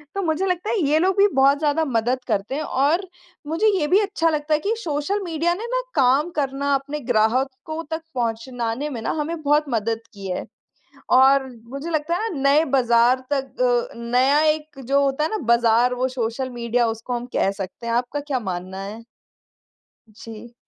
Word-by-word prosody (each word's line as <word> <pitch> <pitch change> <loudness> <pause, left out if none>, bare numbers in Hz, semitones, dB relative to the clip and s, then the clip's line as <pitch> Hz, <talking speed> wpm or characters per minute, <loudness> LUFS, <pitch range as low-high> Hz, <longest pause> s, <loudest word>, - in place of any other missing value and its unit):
तो 395 - -1
मुझे 320 +3 0
लगता 365 +2 -1
है 450 - +1
ये 305 +2 +3
लोग 375 +3 +1
भी 405 +1 +6
बहुत 275 +1 +5
ज़्यादा 315 +1 +1
मदद 245 0 0
करते 210 +4 -1
हैं 310 - -2
और, 305 +8 +1 0.4
मुझे 330 +8 +1
ये 295 - 0
भी 380 +5 +4
अच्छा 395 -5 +1
लगता 305 0 -1
है 300 - +3
कि 415 +7 -1
सोशल 315 +7 -1
मीडिया 335 0 0
ने 445 +5 -6
ना - - +1
काम 275 +4 +3
करना 280 0 0
अपने 285 +2 -3
ग्राहकों 260 +6 0
तक 320 0 -2
पहुँचाने 235 +3 -2
में 235 -5 -5
ना - - -1
हमें 320 +1 -4
बहुत 295 +1 +2
मदद 225 -1 -1
की 195 -1 -8
है। 180 - -3 0.6
और 265 +1 +5 0.2
मुझे 275 +6 -6
लगता 315 +1 0
है 445 +3 -2
ना 270 - -4
नए 310 +3 +4
बाज़ार 245 -1 +3
तक 270 -2 -2 0.3
अ, - - -13
नया 255 +5 +3
एक 305 -2 -1
जो 280 +2 +2
होता 275 +2 0
है 315 - 0
ना 435 - -2 0.2
बाज़ार 235 +1 +3
वो 255 +1 0
सोशल 235 +3 -2
मीडिया 240 0 0
उसको 225 +2 -4
हम 240 0 -3
कह 195 - +2
सकते 195 +3 -7
हैं। 230 - -1
आपका 245 +4 -1
क्या 285 -3 -2
मानना 185 -2 -5
है? 215 +3 -8 1.1
जी। 225 +2 -11
275 Hz, 190 wpm, -22 LUFS, 235-310 Hz, 1.1 s, भी